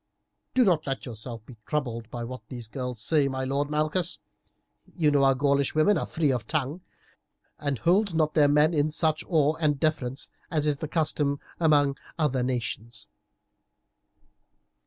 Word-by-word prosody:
Do 255 - +6
not 170 -6 +2
let 135 -1 -3
yourself 115 -1 -7
be 120 -2 -13
troubled 120 -7 -3
by 120 0 -5
what 125 0 -7
these 120 -3 -5
wild - - -33
girls 125 -4 -4
say, 150 0 +3
my 130 -1 -3
lord 140 +2 -1
Malchus; 155 +4 0 0.8
you 155 -4 +3
know 140 -1 +3
our 135 -1 +5
Gaulish 140 +1 +1
women 155 +7 +4
are 160 - -2
free 155 -4 +1
of 120 -4 -2
tongue, 155 +2 -2 0.8
and 140 -2 -1
hold 180 - +2
not 155 -1 +2
their 150 -2 +5
men 150 +3 +4
in 150 -1 +2
such 155 0 +1
awe 155 -4 +3
and 150 -3 +1
deference 140 -4 -1 0.2
as 155 -3 +1
is 145 -2 +1
the 155 - -4
custom 145 -3 0 0.2
among 145 -4 +3 0.2
other 140 -5 +1
nations." 120 -2 -4
145 Hz, 165 wpm, -27 LUFS, 130-155 Hz, 0.8 s, Do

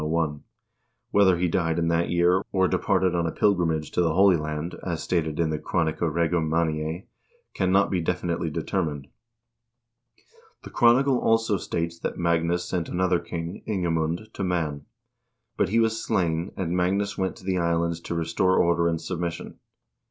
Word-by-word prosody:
Whether 95 -3 +4
he 90 +1 +1
died 80 -2 0
in 85 -1 +1
that 85 +1 +1
year, 90 +2 +3
or 95 -1 +2
departed 95 0 +1
on 85 -1 0
a - - -2
pilgrimage 85 -7 +1
to - - +1
the 80 -2 +1
Holy 95 0 +6
Land 75 +1 -4
as 85 -3 -3
stated 80 -3 -1
in 80 -2 +1
the 75 - -2
"Chronica 80 0 -1
Regum 85 0 0
Manniae" 80 +1 -1 0.5
cannot 95 +1 +2
be 90 -2 0
definitely 85 -1 -2
determined. 75 -3 -3 1.5
The - - -10
chronicle 125 +2 +4
also 115 -2 +2
states 85 -1 -3
that - - -4
Magnus 85 +1 +1
sent 90 -3 -2
another 90 -1 +1
king, 85 +1 -6
Ingemund, 85 0 -1
to - - -4
Man; 80 -6 -2 0.7
but - - +1
he 115 +4 +2
was 115 0 +1
slain, 85 0 0
and 90 -2 -2
Magnus 100 +3 0
went 95 -1 -2
to - - -15
the 95 -1 0
Islands 85 0 0
to 85 - -5
restore 90 +3 +1
order 85 0 +3
and 85 -1 0
submission. 85 -1 -5
85 Hz, 160 wpm, -25 LUFS, 80-95 Hz, 1.5 s, Holy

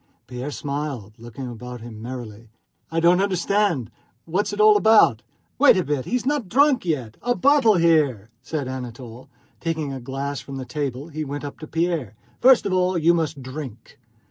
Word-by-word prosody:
Pierre 125 +3 -6
smiled, 140 -7 -4
looking 120 +3 -8
about 125 0 -8
him 115 -2 -10
merrily. 115 -2 -8 0.4
"I 165 - -1
don't 175 +2 +4
understand. 195 - 0 0.3
What's 185 +6 -1
it 205 - -6
all 215 0 +7
about?" 205 - +5 0.4
"Wait 285 -7 +7
a 185 - +1
bit, 145 -3 -2
he - - -2
is 250 - -1
not 275 -8 -1
drunk 275 -1 +3
yet! 130 -10 -2
A 245 0 0
bottle 270 -6 +4
here," 150 - +2
said 145 0 -4
Anatole, 125 0 -8
and 125 -2 -36
taking 160 -4 -2
a 135 - -5
glass 135 +2 -4
from 135 0 -8
the 130 - -5
table 140 0 -4
he 155 0 -4
went 145 0 -5
up 145 - -8
to 155 - -8
Pierre. 165 - -1 0.2
"First 255 -1 +6
of 195 - -1
all 185 0 +2
you 170 +1 +4
must 155 -4 -2
drink!" 130 -4 -9
145 Hz, 185 wpm, -23 LUFS, 125-180 Hz, 0.4 s, all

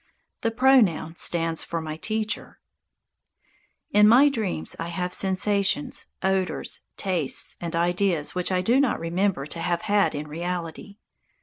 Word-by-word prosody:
The 230 - +1
pronoun 225 -10 +3
stands 165 -1 0
for 170 - -4
my 155 -1 -5
Teacher. 215 +5 -3 1.3
In 210 0 +6
my 260 +6 +7
dreams 205 - -3
I 165 - -3
have 180 +1 -3
sensations, 205 +9 0 0.2
odours, 190 -1 -1 0.2
tastes 175 -8 +1
and 170 -1 -4
ideas 175 -2 0
which 180 +1 -1
I 185 -1 +1
do 235 +8 +3
not 275 -5 +1
remember 175 -2 -1
to 160 +3 -6
have 170 0 -1
had 205 -5 +2
in 150 +1 -5
reality. 175 +4 -5
185 Hz, 135 wpm, -25 LUFS, 165-210 Hz, 1.3 s, my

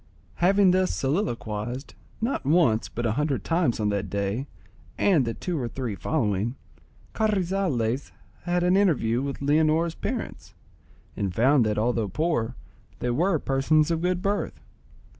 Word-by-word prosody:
Having 195 +1 +4
thus 185 0 +2
soliloquised, 125 - -2 0.3
not 235 +5 -1
once 140 -7 +3
but 120 - -4
a 110 - +2
hundred 145 +3 -1
times 165 -9 +1
on 105 -1 +1
that 100 -2 -2
day, 100 +7 -2 0.5
and 170 -10 +3
the 115 - -3
two 175 -4 -3
or 120 - -2
three 120 -2 -4
following, 105 - -1 0.6
Carrizales 180 - 0 0.3
had 175 0 +1
an 180 +1 +3
interview 135 - +2
with 140 0 -4
Leonora's 155 +3 +2
parents, - - -5 0.6
and 95 -3 -2
found 130 +3 +4
that, 105 - -1
although 115 -1 +1
poor, 125 - -1 0.4
they 120 - -1
were 170 +7 +2
persons 150 +3 +2
of 165 -1 0
good 180 0 0
birth. 200 +1 -1
140 Hz, 140 wpm, -26 LUFS, 115-175 Hz, 0.6 s, Having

